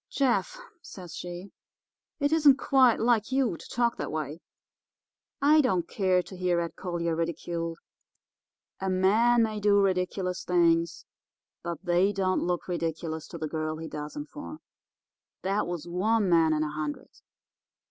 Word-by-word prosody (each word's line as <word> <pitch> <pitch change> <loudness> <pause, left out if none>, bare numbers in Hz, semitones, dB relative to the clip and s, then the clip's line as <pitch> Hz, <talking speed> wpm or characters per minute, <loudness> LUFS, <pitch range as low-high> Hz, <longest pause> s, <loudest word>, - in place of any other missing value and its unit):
"'Jeff,' 275 - 0 0.2
says 180 - -10
she, 175 +2 -7 0.7
'it 285 +1 +1
isn't 295 -4 +6
quite 260 -4 +4
like 230 -1 +2
you 260 -7 +1
to - - -12
talk 235 -1 0
that - - -4
way. 155 +1 -4 1.0
I 300 +2 +5
don't 190 - 0
care 185 -3 +1
to 190 - -11
hear 180 -1 +1
Ed 170 -1 -4
Collier 170 -2 -2
ridiculed. 165 0 -3 1.0
A 190 - -2
man 220 +6 +4
may 215 -1 -2
do 205 0 +4
ridiculous 185 -1 0
things, 170 -1 +2 0.6
but 170 +1 -6
they 175 +3 +3
don't 185 -1 0
look 175 -1 -2
ridiculous 165 -2 -3
to 170 - -8
the 155 -1 -3
girl 155 0 -3
he 160 0 -6
does 150 - -7
'em 295 - -4
for. 295 +1 -9 0.9
That 195 +1 0
was 175 -1 -5
one 205 +4 +1
man 165 -2 +4
in 155 0 +1
a 150 - -3
hundred. 150 -1 -5
180 Hz, 150 wpm, -28 LUFS, 165-220 Hz, 1.0 s, isn't